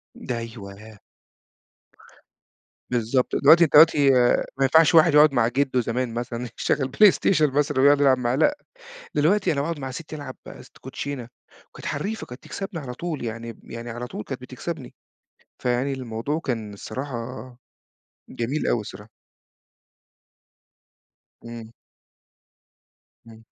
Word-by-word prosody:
ده 120 - -5
أيوه. 110 -2 -10 1.9
بالضبط. 125 +1 0
دلوقتي 160 +4 +6
أنت 155 - 0
دلوقتي 145 -3 +6
آآ 120 0 +3
ما 135 - +1
ينفَعش 160 +4 +5
واحد 160 -1 +6
يقعُد 150 -1 +6
مع 120 -3 +3
جدُّه 130 0 0
زمان 120 0 -2
مثلًا 120 0 -4
يشغّل 135 -2 0
PlayStation 195 -4 +5
مثلًا 145 -2 +1
ويقعُد 145 +1 +5
يلعب 135 -2 +5
معاه، 125 0 -1
لأ، 290 - +2 0.6
دلوقتي 175 +4 +2
أنا 140 - -1
باقعُد 160 +1 -3
مع 135 -1 -5
ستّي 155 +3 -8
ألعب 140 -3 -8
است - - -13
كوتشينة 135 -5 -6 0.4
وكانت - - -11
حرّيفة، 220 +3 -4
كانت 125 +2 -11
تكسَبني 195 -4 -6
على 125 -4 -7
طول، 155 -2 -5
يعني 115 +1 -5
ب - - -20
يعني 115 +1 -7
على 120 +1 -5
طول 105 - -7
كانت 135 -2 -6
بتكسَبني، 130 +3 -7 0.6
فيعني 125 +3 -1
الموضوع 130 +4 -3
كان 115 -9 -4
الصراحة 130 +6 -6 1.1
جميل 125 +6 -3
أوي 120 - +1
الصراحة. 105 +1 -10 2.4
إمم. 115 -1 -9 1.6
إمم. 115 0 -15
130 Hz, 130 wpm, -24 LUFS, 115-150 Hz, 2.4 s, دلوقتي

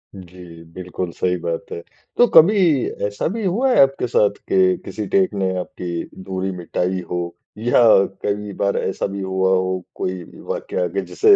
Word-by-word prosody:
जी, 90 -2 -12
बिल्कुल 90 -1 -5
सही 90 0 +1
बात 85 -1 -4
है। 85 - -5 0.4
तो 245 - +7
कभी 200 +6 +7 0.5
ऐसा 100 0 -3
भी 225 - -3
हुआ 225 +9 +1
है - - +6
आपके 135 -2 +2
साथ 105 -3 +2
के 95 -1 +4
किसी 105 - -5
टेक 190 -2 +3
ने 95 -2 0
आपकी 85 -1 -5 0.2
दूरी 95 0 -3
मिटाई 90 +2 -2
हो 90 0 0 0.4
या 115 +3 +2 0.5
कई 105 0 -2
बार 100 - +1
ऐसा 95 - -2
भी 100 0 -5
हुआ 95 0 0
हो 95 0 0 0.2
कोई 90 -1 -3 0.3
वाक़या - - -2
कि - - +1
जिसे 415 -1 +6
95 Hz, 170 wpm, -20 LUFS, 90-120 Hz, 0.5 s, तो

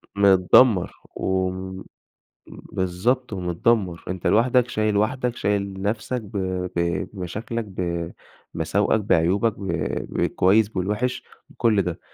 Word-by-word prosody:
متدمر، 100 +1 +5 0.3
و 95 -1 0 1.0
بالضبط، 105 +8 -2
ومتدمر، 90 0 0
أنت 90 -1 -3
لوحدك، 120 +3 +3
شايل 110 -1 0
وحدك، 125 +3 0
شايل 100 -1 -2
نفسك 110 +4 -2
ب 105 0 -7 0.4
ب 85 0 0
بمشاكلك 110 +5 -4 0.9
بمساوئك 100 +6 +1
بعيوبك 100 +4 +2
ب 95 - -5 0.5
بالكويس 100 +3 +3
بالوحش 105 +6 -2 0.3
بكل 110 -4 +2
ده 90 -2 -4
100 Hz, 100 wpm, -23 LUFS, 90-115 Hz, 1.0 s, متدمر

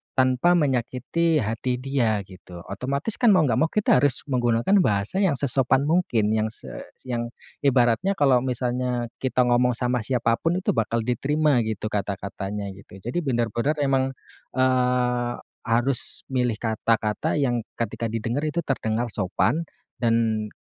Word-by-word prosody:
tanpa 130 +7 +3
menyakiti 145 +2 +1
hati 115 +4 -2
dia 125 -5 0
gitu, 90 -2 -12
otomatis 140 - -3
kan 235 -6 +5
mau 180 - +4
nggak 120 -7 +1
mau 160 - +3
kita 205 -6 +3
harus 140 -1 +1
menggunakan 120 - +2
bahasa 105 - +1
yang 190 -7 +2
sesopan 135 0 +1
mungkin 145 -10 +1
yang 110 0 +1
se 110 - -10 0.3
yang 120 -2 -3 0.3
ibaratnya 135 - +2
kalau 135 -6 +4
misalnya 125 -1 -2
kita 130 -1 +1
ngomong 125 0 +2
sama 125 +1 0
siapapun 120 +7 0
itu - - +2
bakal 115 -1 0
diterima 140 +4 +1
gitu 110 0 -3
kata-katanya 100 0 -4
gitu, 95 0 -14
jadi 125 +9 -2
bener-bener 120 0 0
emang, 135 -1 +1 0.4
eee, 125 -1 +1 0.3
harus 120 +2 0
milih 125 -3 +1
kata-kata 110 -1 0
yang 130 -5 +1 0.2
ketika 115 0 -3
didengar 115 +6 -2
itu 170 +3 -2
terdengar 120 -4 -1
sopan 115 - 0 0.3
dan 115 -2 +1
125 Hz, 135 wpm, -24 LUFS, 115-135 Hz, 0.4 s, kan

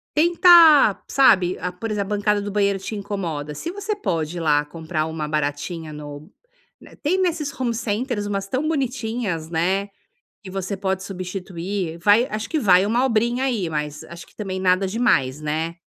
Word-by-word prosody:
tenta 330 - +6
sabe? 190 -9 +4
Ah, 180 - -3
por 215 +5 -6
exemplo, 210 -1 -2
a - - 0
bancada 205 0 +1
do 205 0 -5
banheiro 200 -1 +1
te 205 +3 -6
incomoda. 175 -8 -4
Se 335 - -5
você 405 +2 -3
pode 170 - -2
ir - - -3
lá 150 -2 +3
comprar 160 +1 -3
uma 160 -1 -4
baratinha 155 +2 -3
no 145 0 -9 0.5
né. - - -15
Tem 325 +6 0
nesses 325 -6 -1
home 245 -2 0
centers 230 0 -2
umas 195 -1 -3
tão 260 +8 -1
bonitinhas, 235 - -2
né? 185 +5 0 0.5
Que 195 - -9
você 195 +1 -4
pode 190 -1 -2
substituir. 185 -2 -5
Vai 210 +7 +4
acho 215 +1 -4
que 315 - 0
vai 185 -5 +5
uma 235 +4 +1
obrinha 240 +1 +1
aí, 230 -10 -1
mas 150 -1 -4
acho 170 0 -11
que - - -25
também 190 -3 -4
nada 185 +1 +2
demais, 185 - +1
né. 160 +3 -3
195 Hz, 175 wpm, -22 LUFS, 165-235 Hz, 0.5 s, tenta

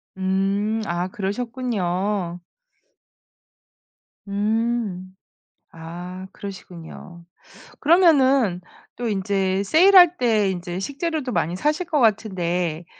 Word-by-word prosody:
음 195 +3 0
아 175 0 -2
그러셨군요. 200 -4 -2 1.9
음 210 -2 -2 0.6
아 175 +3 -8
그러시군요. 175 -3 -10 0.5
그러면은 275 - +4 0.3
또 240 - -4
인제 195 -2 0
세일할 355 - +6
때 215 -5 +2
인제 175 0 -5
식재료도 285 - -3
많이 170 -5 -1
사실 305 - -1
것 305 -4 0
같은데 180 -7 0
200 Hz, 180 characters per minute, -22 LUFS, 180-245 Hz, 1.9 s, 세일할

